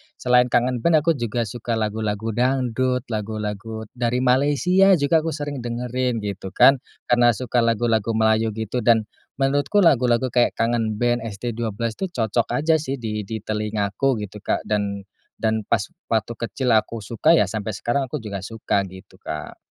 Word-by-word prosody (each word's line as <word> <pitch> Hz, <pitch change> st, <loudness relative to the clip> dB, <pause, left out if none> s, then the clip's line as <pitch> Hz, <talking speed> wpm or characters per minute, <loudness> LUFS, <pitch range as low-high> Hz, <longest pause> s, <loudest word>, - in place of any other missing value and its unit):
selain 125 Hz, 0 st, +3 dB
Kangen 125 Hz, +1 st, +1 dB
Band, 155 Hz, +3 st, +3 dB
aku 165 Hz, -, +3 dB
juga 120 Hz, 0 st, -1 dB
suka 115 Hz, +2 st, -4 dB
lagu-lagu 110 Hz, 0 st, -2 dB
dangdut, 125 Hz, +1 st, 0 dB
lagu-lagu 110 Hz, 0 st, -4 dB
dari 125 Hz, 0 st, -1 dB
Malaysia 145 Hz, +9 st, +4 dB
juga 160 Hz, +1 st, +3 dB
aku 160 Hz, -1 st, -3 dB
sering 145 Hz, -2 st, -4 dB
dengerin 120 Hz, -1 st, -2 dB
gitu, 100 Hz, -2 st, -5 dB
kan. 135 Hz, -1 st, +6 dB, 0.3 s
Karena 120 Hz, -1 st, +5 dB
suka 125 Hz, 0 st, -1 dB
lagu-lagu 115 Hz, -1 st, +1 dB
Melayu 110 Hz, 0 st, +2 dB
gitu, 110 Hz, +2 st, -3 dB
dan 115 Hz, -1 st, +4 dB, 0.4 s
menurutku 140 Hz, +8 st, +2 dB
lagu-lagu 125 Hz, -6 st, +3 dB
kayak 120 Hz, 0 st, +2 dB
Kangen 115 Hz, -2 st, 0 dB
Band, 120 Hz, -1 st, +1 dB
ST12 115 Hz, +1 st, -4 dB
tuh 190 Hz, -, -2 dB
cocok 115 Hz, 0 st, 0 dB
aja 160 Hz, +1 st, +3 dB
sih 140 Hz, -3 st, -3 dB
di 105 Hz, -2 st, -3 dB
di 110 Hz, +1 st, -5 dB
telingaku 105 Hz, +3 st, -1 dB
gitu, 105 Hz, 0 st, -7 dB
Kak. -, -, 0 dB
Dan 100 Hz, -1 st, -1 dB, 0.4 s
dan 110 Hz, -1 st, 0 dB
pas 105 Hz, -, +1 dB, 0.2 s
waktu 115 Hz, 0 st, -1 dB
kecil 125 Hz, +2 st, -2 dB
aku 115 Hz, 0 st, +1 dB
suka, 115 Hz, -, +2 dB
ya, 170 Hz, -, +3 dB
sampai 110 Hz, -1 st, -4 dB
sekarang 120 Hz, +7 st, -1 dB
aku 130 Hz, +2 st, -5 dB
juga 100 Hz, -3 st, -6 dB
suka 105 Hz, -3 st, -1 dB
gitu, 95 Hz, 0 st, -13 dB
Kak. 75 Hz, -, -7 dB
115 Hz, 160 wpm, -22 LUFS, 110-125 Hz, 0.4 s, kan